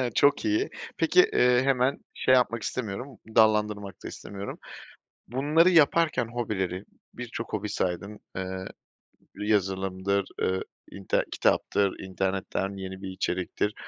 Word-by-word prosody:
Çok 145 - +4
iyi. 320 +6 +1 0.3
Peki, 365 - +5
eee, 125 0 +5
hemen 135 0 +2
şey 130 - +2
yapmak 115 -2 +2
istemiyorum, 125 +3 -4 0.2
dallandırmak 105 -3 +3
da - - -5
istemiyorum. 100 0 -7 0.7
Bunları 150 +8 +4
yaparken 160 -6 +4
hobileri, 100 -6 -3 0.3
birçok 115 -1 -6
hobi 105 0 -2
saydın, 100 +3 -2 0.2
eee, 95 0 -4 0.7
yazılımdır, 95 -1 0 0.2
ııı, 95 0 +1 0.3
inte 100 -1 -1
kitaptır, 100 -2 +1
internetten 95 +1 -2
yeni 95 0 -7
bir 95 - -5
içeriktir, 95 +2 -1
105 Hz, 110 wpm, -27 LUFS, 95-125 Hz, 0.7 s, Peki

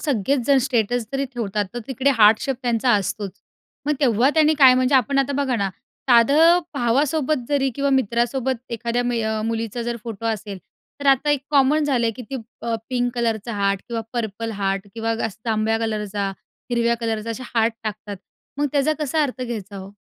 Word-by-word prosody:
सगळेच 265 - 0
जण 280 -1 +5
स्टेटस 240 -2 0
जरी 275 0 0
ठेवतात, 210 -3 -1
तर - - -3
तिकडे 265 +1 +1
हार्ट 215 +1 +6
शेप 270 -2 -2
त्यांचा 240 0 +1
असतोच. 200 0 -2 0.6
मग 300 - +2
तेव्हा 250 0 +3
त्यांनी 315 -1 +4
काय, 260 -3 +8
म्हणजे 255 +2 +2
आपण 275 +1 +3
आता 275 +1 +1
बघा 260 -3 0
ना, 200 -2 0 0.4
साधं 295 +9 +6
भावासोबत 275 +2 +1
जरी 275 -2 +1
किंवा 280 0 0
मित्रासोबत 255 0 0
एखाद्या 235 +1 -1
मय 220 -3 -1
मुलीचा 230 +1 -3
जर 235 0 -3
फोटो 230 -1 -5
असेल, 210 -3 -3 0.4
तर 280 - -3
आता 275 +2 +4
एक 290 - +2
कॉमन 290 +2 +3
झालंय, 245 -5 +1
की 250 - -7
ती 270 - -2 0.3
अ, 230 -1 -1
पिंक 245 -1 0
कलरचा 235 -1 -1
हार्ट, 200 -1 0
किंवा 230 -1 -3
पर्पल 225 -1 -3
हार्ट, 195 +1 -1
किंवा 225 0 -1
गस्त 220 0 -5
जांभळ्या 220 0 +1
कलरचा, 210 -3 -2 0.4
हिरव्या 235 -1 +2
कलरचा 225 -1 -2
असे 240 +3 -5
हार्ट 225 0 +3
टाकतात, 210 -1 -5 0.4
मग 290 - +2
त्याचा 290 +1 +2
कसा 305 +2 +1
अर्थ 260 -3 -3
घ्यायचा 210 -5 -6
हो? 190 0 -8
235 Hz, 180 wpm, -22 LUFS, 220-270 Hz, 0.6 s, काय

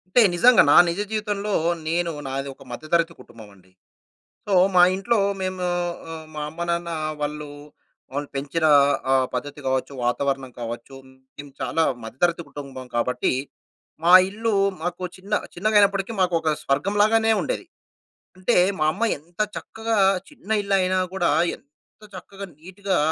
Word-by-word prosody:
అంటే 245 - +8
నిజంగా. 240 +7 +6
నా - - +6
నిజ 170 - -3
జీవితంలో 210 -1 -2 0.4
నేను 170 +1 0 0.2
నాది 135 +1 -3
ఒక 135 - -16
మధ్యతరగతి 165 +5 0
కుటుంబం 115 -2 -14
అండి. 95 0 -24 0.8
సో, 200 - +1 0.2
మా 180 - +7
ఇంట్లో 230 +4 0 0.2
మేము 185 -1 -3 0.5
ఆహ్, 160 -1 -8
మా 150 - -5
అమ్మ-నాన్న 170 +1 -3 0.3
వాళ్ళు 150 0 -4 0.7
వాళ్ళు 145 0 -3
పెంచిన 145 +4 -1 0.5
ఆహ్, 130 -1 +4
పద్ధతి 145 +3 -5
కావచ్చు, 130 +1 -1
వాతావరణం 135 +1 -1
కావచ్చు. 120 +3 -7 0.4
మేము 145 0 -10
చాలా 165 - 0 0.2
మధ్యతరగతి 170 +10 -1
కుటుంబం 135 -3 -8
కాబట్టి 125 +2 0 0.7
మా 175 - +5 0.2
ఇల్లు 225 +2 -2 0.3
మాకు 175 +1 -4
చిన్న 195 +3 -4 0.2
చిన్నగైనప్పటికి 200 +1 +2
మాకు 180 -1 +2
ఒక 160 - -1
స్వర్గం 145 +9 0
లాగానే 225 +1 +3
ఉండేది. 370 - -3 0.7
అంటే 185 +6 +1 0.2
మా - - +1
అమ్మ 205 +7 -2
ఎంత 170 +6 -18 0.2
చక్కగా 225 0 -3 0.3
చిన్న 260 -8 -15
ఇల్లయినా 190 -2 +1 0.2
కూడా 185 -2 +1 0.3
ఎంత 145 +8 -34
చక్కగా 195 +2 -9
నీట్‌గా 190 +3 -3
170 Hz, 135 wpm, -23 LUFS, 140-200 Hz, 0.8 s, అంటే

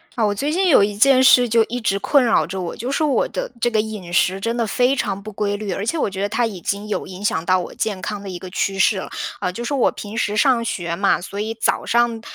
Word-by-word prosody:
啊， 225 -3 +1
我 205 - +1
最 280 +9 -2
近 370 +2 +2
有 265 - +6
一 205 0 -1
件 260 +3 +5
事 250 -1 +6
就 230 0 +4
一 245 - -4
直 200 -3 0
困 280 +5 +3
扰 220 -9 +3
着 190 +2 -5
我， 175 -2 -4
就 245 +4 -4
是 295 - 0
我 290 -3 +2
的 - - -5
这 240 - +3
个 220 -2 0
饮 210 -5 -4
食 185 +2 +2
真 230 +4 -2
的 235 - +1
非 250 +5 +2
常 200 -7 -2
不 215 +2 -8
规 205 0 -2
律， 205 -1 -4
而 195 +3 -3
且 330 - -1
我 - - 0
觉 190 0 -7
得 200 - +1
它 230 +3 0
已 200 -5 -7
经 200 +4 -3
有 210 - -3
影 190 +2 -9
响 160 -5 0
到 185 +1 +3
我 175 - -6
健 205 -4 -2
康 205 +3 -4
的 - - -8
一 180 -2 -6
个 185 - -9
趋 195 +1 -2
势 195 +1 +3
了。 190 - -5 0.3
呃， 180 - -2
就 235 - -5
是 265 - -3
我 265 - +3
平 210 +2 -8
时 210 -2 0
上 235 +1 +3
学 170 -6 -3
嘛， 195 0 +1
所 200 +2 -7
以 220 +2 -2
早 225 - -1
上， 235 -1 +1
210 Hz, 310 characters per minute, -20 LUFS, 195-240 Hz, 0.3 s, 有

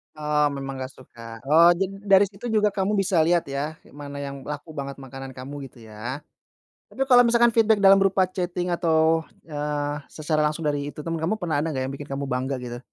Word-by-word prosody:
Oh, 150 -1 +1
memang 135 -1 -5
enggak 130 0 -6
suka. 115 -2 -12
Oh, 160 +5 +6
jadi 190 +2 -1
dari 195 -1 +5
situ 200 +4 -6
juga 210 -2 +2
kamu 200 +1 0
bisa 195 -3 +2
lihat 170 +2 +3
ya, 145 +3 -3
kayak, - - -20
mana 145 0 -9
yang 140 0 -5
laku 150 +2 -6
banget 140 -2 -5
makanan 135 -1 -9
kamu, 135 +2 -7
gitu 120 -2 -17
ya? 120 +7 -6 0.6
Tapi, 270 - -2
kalau 245 -2 +6
misalkan 235 0 +4
feedback 220 -2 +3
dalam 195 0 +8
berupa 195 -1 +3
chatting 180 -1 -2
atau, 160 -1 +2 0.2
eee, 145 -1 -3
secara 155 0 -2
langsung 155 +2 -4
dari, 145 -1 -1
itu, 150 +1 -8
teman, 165 0 -3
kamu 165 +7 0
pernah 175 -8 -1
ada 155 - -1
enggak 135 -5 -2
yang 130 - -3
bikin 145 +1 -9
kamu 140 0 -4
bangga, 130 +2 -1
gitu? 120 0 -6
150 Hz, 210 wpm, -24 LUFS, 140-190 Hz, 0.6 s, dalam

